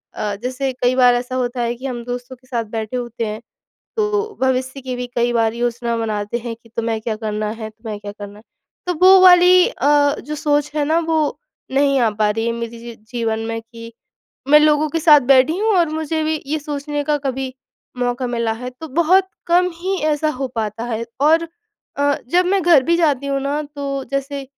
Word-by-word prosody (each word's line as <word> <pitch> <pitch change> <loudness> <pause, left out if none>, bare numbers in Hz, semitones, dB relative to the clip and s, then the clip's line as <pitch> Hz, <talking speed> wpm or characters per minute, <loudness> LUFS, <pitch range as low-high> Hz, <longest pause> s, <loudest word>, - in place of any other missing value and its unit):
अ, 210 -1 -2
जैसे 260 +1 -2
कई 250 0 0
बार 250 -1 +5
ऐसा 250 +1 -3
होता 245 -1 -2
है 235 0 0
कि 255 +3 -10
हम 245 -3 -4
दोस्तों 245 +1 -6
के 255 +1 -27
साथ 235 -3 -2
बैठे 220 +2 -3
होते 240 -1 -4
हैं, 215 +1 -5 0.6
तो 420 0 -1
भविष्य 260 +1 0
की 255 -1 -5
भी 245 0 -4
कई 240 0 +2
बार 225 -1 +1
योजना 235 0 -2
बनाते 215 0 -2
हैं 235 -1 -6
कि 230 0 -22
तुम्हें 225 -1 -1
क्या 220 0 -3
करना 215 -1 -3
है, 220 0 -6
तुम्हें 220 -1 -8
क्या 205 0 -7
करना 205 0 -10
है। - - -16 0.4
तो 360 - 0
वो 380 0 +8
वाली 360 0 +7
अ, 285 0 +2
जो 300 - -6
सोच 295 0 0
है 295 - +1
ना, 315 +3 +2
वो 320 -2 0 0.3
नहीं 275 0 +3
आ 230 -2 +3
पा 210 0 0
रही 225 +2 -2
है 235 - 0
मेरे 235 0 -4
जी - - -13
जी 235 0 -9 0.2
जीवन 225 -2 -1
में 225 0 -3
कि 230 0 -12 0.6
मैं 300 +1 +8
लोगों 305 0 +3
के 330 - -1
साथ 300 -2 +7
बैठी 270 +6 +4
हूँ 435 +2 +2
और 340 -2 +3
मुझे 315 0 -2
भी 310 -1 -1
ये 310 +2 -1
सोचने 290 0 -4
का 300 0 +1
कभी 265 -1 -3 0.4
मौका 245 +1 -1
मिला 235 -2 -1
है। 250 +3 -6
तो 285 +6 -10
बहुत 340 +6 +3 0.2
कम 360 +1 +3
ही 380 +2 -1 0.2
ऐसा 300 +1 0
हो 265 0 -3
पाता 220 +1 -3
है। 230 -1 -3 0.2
और 325 +3 +3 0.5
अ, 285 0 +2
जब 360 +6 +3
मैं 385 0 +2
घर 330 -5 +5
भी 340 0 +2
जाती 290 -5 +1
हूँ 275 -1 -1
ना, 285 +2 -2
तो 280 -2 -5
जैसे 275 0 -3
260 Hz, 215 wpm, -19 LUFS, 235-300 Hz, 0.6 s, वो